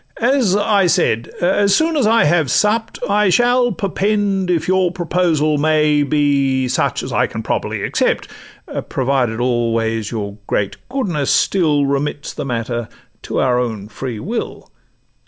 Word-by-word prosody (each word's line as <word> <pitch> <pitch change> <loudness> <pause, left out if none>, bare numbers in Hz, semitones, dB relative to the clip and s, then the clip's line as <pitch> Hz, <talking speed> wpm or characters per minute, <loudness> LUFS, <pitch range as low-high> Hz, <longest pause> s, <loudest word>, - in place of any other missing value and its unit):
—as 240 -5 +2
I 205 -2 +2
said, 115 -8 +1
as 195 +3 +3
soon 320 +1 +1
as 270 -8 +2
I 230 +1 +4
have 160 0 +2
supt, 220 +2 +1
I 205 0 +2
shall 245 +4 +3
perpend 200 -2 -1
if 170 -3 0
your 185 -1 +2
proposal 165 -4 0
may 150 -1 +2
Be 140 -2 +1
such 125 - -1
as - - -6
I - - +2
can - - -6
properly - - -2
accept; - - 0 0.6
Provided 125 -4 0
always 115 -3 0
your 105 -3 -5
great 100 -2 -1
goodness 185 - -2
still 150 -7 +2
Remits 140 +1 -2
the - - -5
matter 120 -2 -3 0.3
to - - -3
our 125 -1 +2
own 110 -4 -4
free 120 0 -6
will. 225 - -5
155 Hz, 145 wpm, -18 LUFS, 125-200 Hz, 0.6 s, I